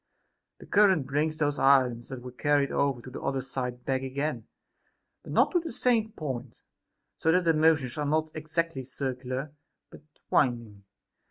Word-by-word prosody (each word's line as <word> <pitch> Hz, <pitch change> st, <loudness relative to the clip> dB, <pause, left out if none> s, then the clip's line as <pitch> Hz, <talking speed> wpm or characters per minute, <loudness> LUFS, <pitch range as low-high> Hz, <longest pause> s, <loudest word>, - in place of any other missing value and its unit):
The -, -, -13 dB
current 190 Hz, -8 st, +4 dB
brings 150 Hz, +3 st, -1 dB
those 145 Hz, -2 st, 0 dB
islands 130 Hz, -4 st, +3 dB
that 130 Hz, -2 st, -7 dB
were 125 Hz, -, -7 dB
carried 145 Hz, +2 st, +1 dB
over 135 Hz, -4 st, 0 dB
to 130 Hz, -, -10 dB
the -, -, -7 dB
other 135 Hz, -1 st, -1 dB
side 125 Hz, -1 st, -5 dB
back 130 Hz, -1 st, 0 dB
again; 135 Hz, -2 st, -3 dB, 0.7 s
but -, -, -10 dB
not -, -, +3 dB
to 355 Hz, -, +3 dB
the 325 Hz, -2 st, -6 dB
same 225 Hz, -3 st, +1 dB
point, 130 Hz, -, -5 dB, 0.6 s
so 160 Hz, -, +2 dB
that 180 Hz, +2 st, +3 dB
their 165 Hz, -1 st, +3 dB
motions 155 Hz, -4 st, +2 dB
are 150 Hz, -, 0 dB
not 155 Hz, +1 st, 0 dB
exactly 155 Hz, -2 st, -2 dB
circular, 130 Hz, +1 st, -4 dB, 0.4 s
but -, -, -13 dB, 0.3 s
winding. 115 Hz, -6 st, 0 dB
140 Hz, 165 wpm, -28 LUFS, 130-155 Hz, 0.7 s, current